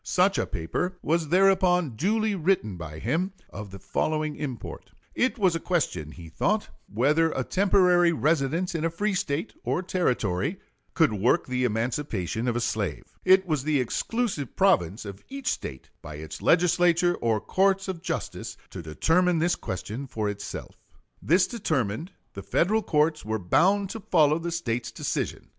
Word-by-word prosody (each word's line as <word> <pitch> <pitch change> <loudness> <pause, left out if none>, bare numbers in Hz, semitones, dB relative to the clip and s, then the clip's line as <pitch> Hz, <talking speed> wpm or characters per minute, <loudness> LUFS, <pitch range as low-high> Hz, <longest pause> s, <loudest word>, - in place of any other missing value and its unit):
Such 190 +2 +2
a - - -1
paper 180 - -3
was 165 0 +1
thereupon 180 -2 +3
duly 215 - +1
written 170 - 0
by 80 -3 -8
him, 165 - -1 0.2
of 105 0 -7
the 95 - -9
following 155 - -1
import: 130 -6 -6 0.2
It 260 +2 +1
was 190 -6 +3
a - - -1
question, 160 - -1
he 85 -2 -11
thought, 205 - 0 0.2
whether 150 +9 +3
a 130 - -1
temporary 180 -1 +4
residence 160 +2 0
in 165 -2 -2
a 165 - +2
free 205 +5 -1
State 160 0 -2
or 180 - -1
Territory 140 - 0 0.4
could 160 -9 +4
work 105 +4 +2
the 125 0 -1
emancipation 115 - -2
of 120 - 0
a - - +1
slave. 105 -8 -2 0.2
It 190 +1 +5
was 155 -6 -1
the 150 -1 +1
exclusive 150 - -2
province 110 - +2
of 100 -1 -9
each 275 -1 -2
State, 65 - -6
by 75 - -8
its 75 +1 -8
Legislature 175 0 +3
or 115 -8 0
courts 195 - +1
of 185 -3 -4
justice, - - -4
to 95 - -6
determine 165 - +2
this 170 +2 +2
question 110 +8 -5
for 110 -4 -2
itself. 100 0 -7 0.4
This 180 +4 +4
determined, 155 - -2 0.2
the 100 - -7
Federal 180 - +1
courts 155 -3 +1
were 110 0 -2
bound 190 - +2
to 225 - -5
follow 155 -6 +3
the 170 +1 -3
State's 120 -8 -2
decision. - - -3
155 Hz, 160 wpm, -26 LUFS, 115-185 Hz, 0.4 s, It